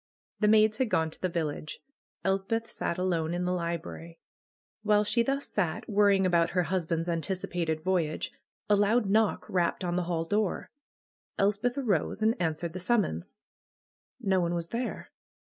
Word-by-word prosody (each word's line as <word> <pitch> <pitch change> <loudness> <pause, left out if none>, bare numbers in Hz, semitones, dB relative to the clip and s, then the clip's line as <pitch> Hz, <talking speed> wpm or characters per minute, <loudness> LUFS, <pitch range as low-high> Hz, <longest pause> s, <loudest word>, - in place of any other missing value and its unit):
The 210 - +3
maids 215 0 +5
had 260 -3 +1
gone 160 -5 +1
to - - -16
the 185 - 0
village. 155 -3 -3 0.4
Elspeth 195 +4 0
sat 170 - -3
alone 170 -3 0
in 180 0 -1
the 180 - 0
library. 170 -1 -4 0.6
While 210 -1 +3
she 210 +3 +2
thus 275 +3 -1
sat, 175 -6 -1
worrying 200 -2 +4
about 170 -2 +3
her 180 - +4
husband's 165 -1 -1
anticipated 170 -2 -2
voyage, 170 -4 0 0.4
a 210 - +5
loud 210 +3 +3
knock 215 +2 +2
rapped 180 0 0
on 175 0 -1
the 180 - 0
hall 165 -2 -1
door. 205 +1 -1 0.7
Elspeth 210 +6 +1
arose 215 - 0
and 220 +1 +4
answered 160 0 -1
the 185 - -5
summons. 185 - 0 0.8
No 195 -6 +2
one 170 0 0
was 170 -1 -3
there. 240 +2 -4
185 Hz, 160 wpm, -29 LUFS, 170-210 Hz, 0.8 s, maids